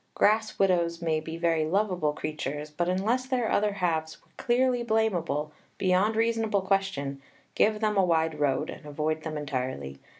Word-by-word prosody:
Grass 215 +1 +2
widows 170 -3 +2
may 160 -2 0
be 160 +1 -6
very 165 -2 +1
lovable 180 -2 +1
creatures, 150 0 -4
but 175 +3 -1
unless 225 +8 0
their 250 -4 0
other 210 0 +2
halves 160 -5 -1
were - - -31
clearly 250 0 +1
blamable, 180 -10 0 0.3
beyond 190 +4 +2
reasonable 225 -3 +1
question, 190 -9 -1 0.3
give 215 0 +2
them 210 -1 +1
a 195 - +5
wide 160 -3 +1
road 145 +1 +1
and - - -10
avoid 155 +2 -2
them 155 -1 -4
entirely. 130 - -4
175 Hz, 160 wpm, -28 LUFS, 155-210 Hz, 0.3 s, a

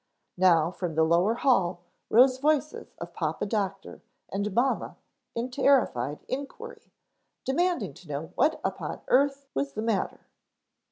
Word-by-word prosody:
Now 170 -3 +4
from 175 -3 -4
the 160 - +4
lower 175 +7 +3
hall 195 -10 +2 0.3
rose 255 +3 +5
voices 300 +1 0
of - - -8
Papa - - -2
Doctor 200 -2 -3 0.3
and 200 +2 -2
mamma 245 +7 0 0.4
in 240 +2 -3
terrified 245 - +2
inquiry, 355 - -7 0.5
demanding 335 - 0
to 180 - -16
know 150 +2 -5
what 315 - +2
upon - - -4
earth 275 +1 +3
was 140 0 -2
the 215 - -3
matter. 225 -4 -1
225 Hz, 130 wpm, -27 LUFS, 175-275 Hz, 0.5 s, rose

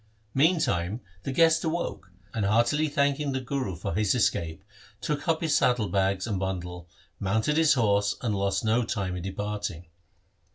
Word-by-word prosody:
Meantime 125 - +2 0.2
the 135 - -4
guest 165 +3 +4
awoke, 160 - -3 0.2
and 110 - -1
heartily 120 +9 +3
thanking 140 0 +1
the 130 - 0
Guru 130 -7 -3
for 85 - -4
his 105 +4 +2
escape 95 -5 0 0.4
took 150 -1 -3
up 165 -1 +2
his 160 -3 +1
saddle 120 -5 +2
bags 95 -1 +1
and 105 -5 -2
bundle, 90 -2 -4 0.3
mounted 110 +9 +1
his 160 -1 +5
horse, 100 -4 +2
and 115 -4 0
lost 100 0 0
no 115 +3 +3
time 95 -5 -2
in 90 - -4
de 95 +2 -4
parting. 105 -3 -4
105 Hz, 165 wpm, -27 LUFS, 95-140 Hz, 0.4 s, his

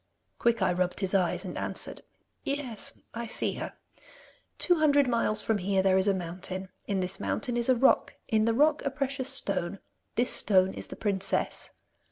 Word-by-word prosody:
Quickeye 220 -6 +2
rubbed 180 +2 -1
his 190 0 -1
eyes 180 -1 +1
and 180 - -5
answered: - - -4 0.4
'Yes, 275 -6 -1
I 235 0 -4
see - - +1
her. - - -5 0.8
Two 355 -3 +3
hundred 285 -3 +4
miles 230 -3 +1
from 220 -2 +1
here 190 0 +1
there 190 -1 +4
is 190 +1 +4
a 200 - +4
mountain. 185 +1 -5 0.2
In 195 -2 0
this 180 +1 -2
mountain 250 -4 -1
is 240 +1 0
a 255 - +6
rock. 260 +3 +3
In 215 -1 +2
the 230 - +2
rock, 300 +3 +4
a - - 0
precious 275 -1 -2
stone. 200 -8 -1 0.4
This 240 +3 +3
stone 190 -2 +3
is - - -5
the - - -8
princess. 200 -2 -1
215 Hz, 180 wpm, -29 LUFS, 190-255 Hz, 0.8 s, a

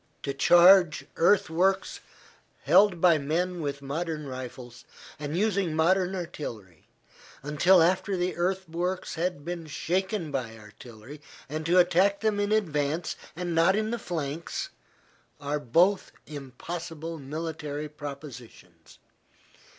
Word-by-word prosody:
To 140 - -2
charge 175 -1 +6
earthworks 190 +1 +2 0.6
held 180 +3 +5
by 170 -3 +5
men 170 +5 -1
with 140 -2 -4
modern 155 +2 -4
rifles, 125 -2 -8 0.4
and 150 +2 -4
using 195 -5 0
modern 185 +3 +2
artillery, 115 - -7 0.6
until 165 +5 +4
after 185 +3 +1
the 180 +1 -1
earthworks 180 0 -2
have 170 -3 -3
been 170 -2 -5
shaken 185 +2 -2
by 120 -5 -4
artillery, 110 +6 -13 0.3
and 155 +3 -4
to 175 +2 +3
attack 185 +3 +3
them 215 -2 +1
in 205 0 0
advance 160 -6 0 0.2
and 175 0 -3
not 165 +4 +4
in 215 +1 -1
the 235 - -2
flanks, 160 -3 -4 0.7
are 145 +1 -2
both 175 - +2
impossible 160 +3 -7
military 150 +1 -5
propositions. 140 -5 -11
165 Hz, 115 wpm, -27 LUFS, 145-185 Hz, 0.7 s, charge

